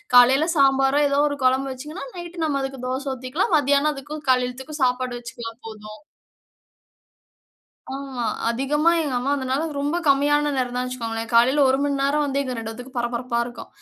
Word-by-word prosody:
காலையில 265 +6 +7
சாம்பாரோ, 270 +1 +4
ஏதோ 280 0 +1
ஒரு 285 - -4
குழம்பு 265 +1 +2
வச்சிங்கன்னா, 300 +8 -8
நைட்டு 345 -1 -4
நம்ம 280 -3 0
அதுக்கு 270 -1 -5
தோச 265 +2 -3
ஊத்திக்கலாம், 260 +9 -2
மதியானம் 285 +1 +2
அதுக்கும் 295 +3 -8
காலையத்துக்கும் 255 +4 -2
சாப்பாடு 255 0 0
வச்சுக்கலாம் 235 0 -8 0.2
போதும். 215 +4 -10 1.9
ஆமா. 270 -3 -5 0.3
அதிகமா 290 +7 +2
எங்க 290 -5 -2
அம்மா 275 +3 -1
வந்தனால 270 +2 -1 0.2
ரொம்ப 290 +4 0
கம்மியான 290 +1 +3
நேரம் 250 -1 -1
தான் 250 0 -1
வச்சுக்கோங்களேன், 230 -3 -4
காலையில 255 +5 +5
1 265 - +2
மணி 285 -1 0
நேரம் 290 +2 +2
வந்து 280 0 -1
எங்க 255 -2 -4
2 225 0 -5
பேத்துக்கும் 250 +3 -10
பரபரப்பா 240 0 -2
இருக்கும். 240 -1 -9
270 Hz, 160 wpm, -23 LUFS, 250-285 Hz, 1.9 s, காலையில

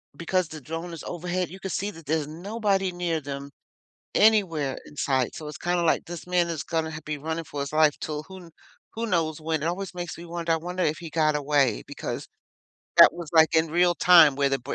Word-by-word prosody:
because 175 +3 0
the 155 -2 -8
drone 165 +4 -6
is 165 - -8
overhead, 180 0 -3
you 190 - -10
could 190 0 -5
see 200 - -2
that 165 -5 -14
there's 155 0 0
nobody 195 +3 -1
near 175 -2 -2
them 140 0 -6 0.6
anywhere 180 -11 +3
in 150 - -14
sight, 130 -3 0
so 155 - -7
it's 150 - -7
kinda, 175 0 0
like, 165 - +2
this 175 0 -8
man 175 -1 +2
is 165 -2 -3
gonna 160 -1 -2
h 160 0 -6
be 150 -1 -3
running 160 +3 -4
for 145 -1 -5
his 140 - -4
life 155 -1 +4
'til 150 -1 -4
who 190 +2 -11
kn 170 -2 -14 0.4
who 230 +1 -3
knows 165 -7 0
when 160 -1 -2
it - - +1
always 190 +2 -3
makes 175 -2 -6
me 170 - -9
wonder 170 0 -3
I 165 - +3
wonder 180 +3 -3
if 155 +1 0
he 170 -1 -8
got 155 -1 +2
away, 140 -5 +1
because - - -5 0.7
that - - +10
was, 170 -3 -7
like, 160 0 +5
in 160 0 +3
real 175 +1 +3
time 170 -5 +7
where 140 -1 +2
the 135 - +1
br 130 +2 -5
165 Hz, 230 wpm, -26 LUFS, 150-175 Hz, 0.7 s, that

